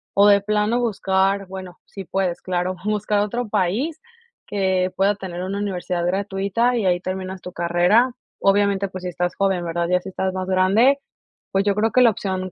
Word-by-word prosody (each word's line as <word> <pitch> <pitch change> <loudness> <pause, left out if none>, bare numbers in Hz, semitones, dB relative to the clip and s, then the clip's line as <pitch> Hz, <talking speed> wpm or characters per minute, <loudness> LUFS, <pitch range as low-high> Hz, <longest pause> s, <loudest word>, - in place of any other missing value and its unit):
o 200 +1 +6
de 200 -1 +6
plano 210 +3 +1
buscar 195 -3 +1
bueno, 185 -1 -8
sí 195 - -9
puedes 185 0 -2
claro, 185 0 -2
buscar 210 0 0
otro 235 +4 -1
país 220 - -1 0.5
que 190 -2 0
pueda 200 +2 +2
tener 180 -3 -6
una 195 +2 -3
universidad 180 -3 -2
gratuita, 200 +5 0
y 220 - -1
ahí 180 -1 +2
terminas 185 0 -5
tu 180 - -8
carrera. 175 +9 +3 0.3
Obviamente, 200 0 +2
pues 185 -1 -8
si 180 - -3
estás 175 0 -2
joven, 190 -3 0
¿verdad? 170 0 -1
Ya 180 0 +3
si - - -8
estás 190 0 -2
más 185 0 -4
grande, 200 +9 +4 0.5
pues 195 0 +2
yo 205 - +3
creo 220 +2 +1
que 255 - +4
la 235 -2 +6
opción, 185 -2 -4
195 Hz, 185 wpm, -22 LUFS, 185-205 Hz, 0.5 s, o